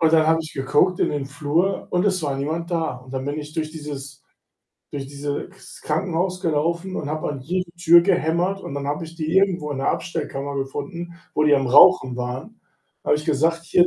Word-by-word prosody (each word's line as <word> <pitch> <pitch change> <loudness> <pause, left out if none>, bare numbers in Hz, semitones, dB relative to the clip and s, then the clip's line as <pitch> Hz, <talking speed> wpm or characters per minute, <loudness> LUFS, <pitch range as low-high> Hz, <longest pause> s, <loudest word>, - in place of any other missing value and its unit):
Und 160 0 +4
dann 160 -1 +5
habe 160 0 +4
ich 155 - -9
geguckt 145 +7 +2
in - - +2
den 145 -2 -2
Flur 150 +7 0
und 180 +2 +1
es 185 -4 +1
war 140 -2 -1
niemand 160 +5 -3
da. 165 -6 -1
Und 130 +1 -13
dann 130 0 -3
bin 145 +2 -3
ich 150 0 -7
durch 155 -1 -2
dieses 140 -3 -8 0.7
durch 140 -2 -5
dieses 145 +3 -4
Ks 190 - -14
Krankenhaus 180 +3 -1
gelaufen 170 +3 -1
und 145 - -3
habe 155 0 -2
an 140 -2 -5
jede 180 +5 -2
Tür 170 -1 +6
gehämmert 180 +1 +1
und - - -7
dann 140 0 -4
habe 150 +3 -2
ich 160 - -11
die 160 +2 -1
irgendwo 180 -6 +2
in 145 - -3
der 135 - +1
Abstellkammer 145 -5 -3
gefunden, 145 +6 -5 0.2
wo 150 - +2
die 150 -1 +5
am 135 -1 +2
Rauchen 125 -1 +6
waren. 125 - -5 0.4
Da - - -2
habe - - +5
ich 150 - -7
gesagt: 165 +3 +1
„Hier, 175 +1 +4
155 Hz, 215 wpm, -23 LUFS, 140-170 Hz, 0.7 s, Tür